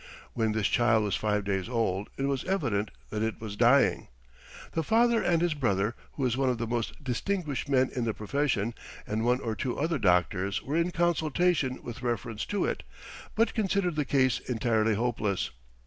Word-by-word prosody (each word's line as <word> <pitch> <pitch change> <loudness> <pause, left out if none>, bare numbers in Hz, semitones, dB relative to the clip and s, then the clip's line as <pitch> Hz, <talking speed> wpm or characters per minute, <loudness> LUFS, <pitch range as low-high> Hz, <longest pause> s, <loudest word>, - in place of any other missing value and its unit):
When 110 -2 0
this 110 -2 0
child 110 -1 +3
was 105 - 0
five 105 -1 0
days 95 0 -2
old 105 -5 -1
it 135 - -2
was 135 -2 0
evident 120 - 0 0.2
that 110 - -2
it 110 -1 -1
was 110 -2 -6
dying. 120 +5 +4 0.6
The 165 - 0
father 230 +5 +3
and 170 -3 +2
his 175 -2 +2
brother, 110 -6 0 0.2
who 135 - -2
is 120 -2 +1
one 135 0 +1
of 125 - 0
the 115 - -2
most 120 +4 -3
distinguished 145 +2 -2
men 130 -2 +3
in 125 -2 0
the 110 - 0
profession, 120 -1 0 0.3
and 110 +1 -2
one 125 +1 +3
or 115 - -2
two 125 +1 -3
other 160 0 0
doctors 90 0 +1
were 145 - -3
in 170 +1 +2
consultation 170 -4 +1
with 120 0 -7
reference 115 -3 -2
to 205 - 0
it, - - -2 0.5
but 225 +1 +2
considered 195 -5 0
the 150 - +1
case 130 -3 +2
entirely 110 -2 +1
hopeless. 105 -4 -1
125 Hz, 185 wpm, -29 LUFS, 110-150 Hz, 0.6 s, dying